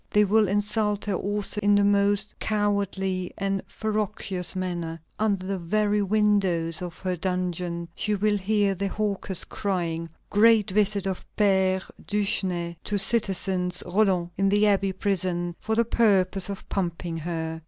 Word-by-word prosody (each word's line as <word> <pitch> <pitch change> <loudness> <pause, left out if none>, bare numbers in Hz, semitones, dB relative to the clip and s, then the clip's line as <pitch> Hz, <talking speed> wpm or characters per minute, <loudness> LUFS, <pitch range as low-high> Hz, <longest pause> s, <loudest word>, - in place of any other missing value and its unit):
They 210 0 +4
will 215 +1 +3
insult 205 +1 0
her 205 - -1
also 205 +2 -1
in 205 0 +4
the 205 - +4
most 200 0 +2
cowardly 200 -3 -1
and 195 -1 -1
ferocious 210 -4 -2
manner. 175 -3 -3 0.2
Under 200 -4 0
the 195 0 -2
very 210 +4 +1
windows 195 -5 +1
of 175 -1 -6
her 185 -1 -2
dungeon 175 -1 -2
she 210 +3 -1
will 205 +1 +1
hear 205 0 +1
the 195 +1 -2
hawkers 200 -2 -2
crying: 170 -4 -2 0.2
"Great 215 -1 +5
visit 205 0 +1
of 190 -2 -3
Père 190 -2 +3 0.2
Duchesne 185 -4 -1
to 205 - -1
Citizeness 190 -3 +1
Roland, 180 -2 +1
in 195 +1 +2
the 205 +1 +3
Abbey 195 -1 +2
prison, 180 -3 -1
for 220 - -1
the 235 +1 +3
purpose 195 -4 +2
of 200 - -7
pumping 170 -3 -3
her." 160 0 -4
195 Hz, 145 wpm, -26 LUFS, 180-205 Hz, 0.2 s, Great